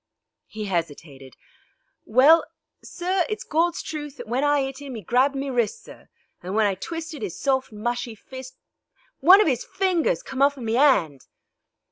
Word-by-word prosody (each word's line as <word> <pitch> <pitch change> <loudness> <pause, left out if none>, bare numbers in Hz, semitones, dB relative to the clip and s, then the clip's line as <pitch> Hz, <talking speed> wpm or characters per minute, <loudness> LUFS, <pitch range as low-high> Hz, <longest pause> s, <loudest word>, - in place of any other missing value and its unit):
He 215 0 -6
hesitated. 150 - -5 0.7
"Well, 275 +9 +6 0.4
sir, 365 +1 -1
it's 430 - -4
Gawd's 335 +2 0
truth 295 -2 -6
that 245 -2 -9
when 250 +5 -1
I 290 -1 +3
'it 270 +1 -5
'im 270 -4 -7
'e 215 - -9
grabbed 255 +8 +2
me 275 0 -3
wrists, 245 - -1
sir, - - -15 0.3
and 185 +3 -5
when 220 -1 +3
I 200 - +2
twisted 320 - -7
'is 195 -5 -5
soft, 265 -3 0
mushy 235 +2 -4
fist 260 +4 -11 0.6
one 365 +8 +7
of - - +2
'is 255 -5 0
fingers 385 +6 0
come 265 - -5
off 285 0 +3
in 245 - -7
me 225 +1 0
'and." 175 - +3
265 Hz, 170 wpm, -24 LUFS, 220-300 Hz, 0.7 s, one